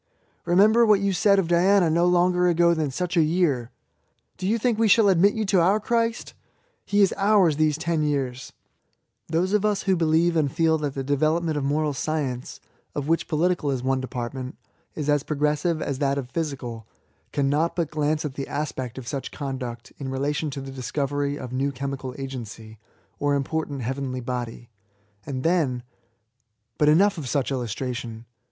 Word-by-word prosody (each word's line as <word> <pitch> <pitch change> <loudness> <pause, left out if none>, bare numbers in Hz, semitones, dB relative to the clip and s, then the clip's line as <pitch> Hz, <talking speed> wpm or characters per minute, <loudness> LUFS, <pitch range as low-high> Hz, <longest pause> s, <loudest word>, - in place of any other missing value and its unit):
''Be 175 +1 +2
member 215 +4 +6
what 210 -3 +5
you 200 0 0
said 200 +3 +4
of 190 -4 +1
Diana 180 +2 +4
no 170 +2 +2
longer 180 0 +3
ago 170 0 +4
than 155 -3 -1
such 180 +6 -3
a 170 - +5
year!" 155 -7 +1 0.7
"Do 185 - -3
you 220 +3 +2
think 230 -1 0
we 225 - +4
shall 210 0 +5
admit 195 +2 +4
you 220 -1 -1
to 190 -2 +3
our 195 +5 +3
Christ? 230 +1 -1 0.5
He 205 0 +3
is 195 - +3
ours 195 -6 +3
these 155 -1 +2
ten 160 -1 -1
years! 135 -4 -2 0.4
" - - -49
Those 175 +5 0
of 210 - +3
u£ 210 -1 0
who 190 - +2
believe 165 +1 +2
and 150 -4 +1
feel 160 0 +2
that 145 -2 -3
the 135 - -3
development 155 +4 +1
of 145 - -1
moral 150 +2 0
science 135 -4 -3 0.4
(of 145 -1 -3
which 165 +1 +1
poli 175 +3 +2
tical 145 -4 -2
is 130 -2 -2
one 130 0 0
department) 130 +1 -5 0.4
is 150 -2 -4
as 145 -1 +3
progressive 150 +3 0
as 135 -1 -3
that 140 -1 +1
of 130 -2 -5
physical^ 130 -9 -4 0.5
cannot 145 +4 +1
but 165 -4 -1
glance 150 0 0
at 145 - -4
the 135 0 -5
aspect 135 -4 -4
of 130 -2 -8
such 135 +2 -4
conduct 130 -5 -6
in 135 -2 -4
relation 145 +3 -1
to 140 0 -6
the 135 0 -8
discovery 140 +3 -2
of 125 -3 -7
a - - -4
new 140 +2 0
chemical 135 -1 -5
agency, 115 -5 -8 0.4
or 145 0 +1
important 140 -1 -2
heavenly 130 +1 -3
body; 120 -1 -5 0.6
and 130 -2 -4
then 160 -7 +2
•.. - - -9 1.0
But 150 - +5
enough 190 +4 +4
of 135 -5 -5
such 140 0 0
illustration. 120 -2 -4
150 Hz, 185 wpm, -24 LUFS, 135-175 Hz, 1.0 s, member